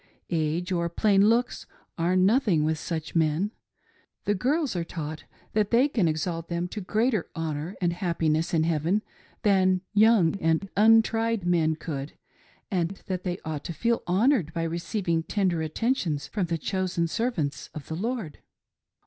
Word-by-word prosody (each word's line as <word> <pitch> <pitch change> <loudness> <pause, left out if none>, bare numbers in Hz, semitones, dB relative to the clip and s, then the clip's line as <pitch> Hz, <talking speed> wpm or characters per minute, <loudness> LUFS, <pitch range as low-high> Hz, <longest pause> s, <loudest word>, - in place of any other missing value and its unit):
Age 165 +3 -1
or 170 -1 0
plain 200 +2 +3
looks 240 +2 0 0.3
are 175 +2 +1
nothing 190 - +3
with 155 0 0
such 160 0 -4
men; 165 +5 +1 0.7
the 205 - +2
girls 270 - 0
are 175 - -1
taught 155 -2 -6 0.3
that 210 -1 +2
they 245 +4 +4
can 225 - +1
exalt 165 +1 -2
them 170 +1 -2
to 210 - -5
greater 215 +1 0
honor 160 +2 -3
and 175 -2 +1
happiness 165 -3 0
in 160 -2 +2
heaven 165 +6 +1 0.4
than 185 -3 +3
young 210 -5 +4
and 165 +4 +1
untried 225 -1 +4
men 165 -3 +2
could, 150 -3 -5 0.6
and 180 0 -1
that 185 -2 -3
they 180 -1 -2
ought 155 -2 -4
to 170 - -4
feel 235 +7 0
honored 195 - +2
by 165 - -1
receiving 170 +1 -1
tender 180 -2 0
attentions 160 - -1
from 195 -5 -2
the 165 0 -1
chosen 185 0 -1
servants 165 - -2
of 150 - -7
the 160 - -4
Lord. 215 - -3
175 Hz, 155 wpm, -26 LUFS, 160-210 Hz, 0.7 s, they